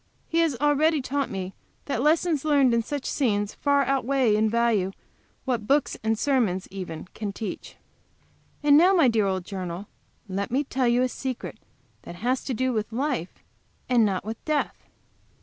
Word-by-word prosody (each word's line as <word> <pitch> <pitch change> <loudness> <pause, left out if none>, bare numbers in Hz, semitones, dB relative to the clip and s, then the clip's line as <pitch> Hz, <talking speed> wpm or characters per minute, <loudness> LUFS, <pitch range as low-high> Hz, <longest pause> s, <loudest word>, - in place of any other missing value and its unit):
He 335 - 0
has 325 -5 +2
already 295 +3 +2
taught 275 +1 -2
me 190 -1 -5 0.3
that 275 -4 -1
lessons 310 0 +2
learned 280 -5 +4
in 235 - +3
such 280 +4 -5
scenes 205 -6 0
far 280 -1 +2
outweigh 265 -3 +2
in 215 +1 +2
value 220 -5 +1 0.5
what 240 -5 -1
books 280 +2 +2
and 220 0 +1
sermons, 220 -9 +1
even, 180 -5 -6
can 210 -2 -4
teach. 210 +2 -6 0.9
And 290 -1 +6
now, 360 +6 +6
my 330 -7 +5
dear 220 -4 +2
old 190 -2 -2
journal, 185 0 -5 0.4
let 195 +1 -3
me 270 +5 +1
tell 260 -2 0
you 240 +1 +3
a - - +2
secret 255 0 -5 0.4
that 175 - -9
has 245 +8 -1
to 260 - -2
do 260 +2 0
with 215 0 -2
life, 250 - -3 0.4
and 245 -3 +4
not 195 -3 0
with 220 +1 -6
death. 305 -2 0
245 Hz, 170 wpm, -25 LUFS, 210-280 Hz, 0.9 s, And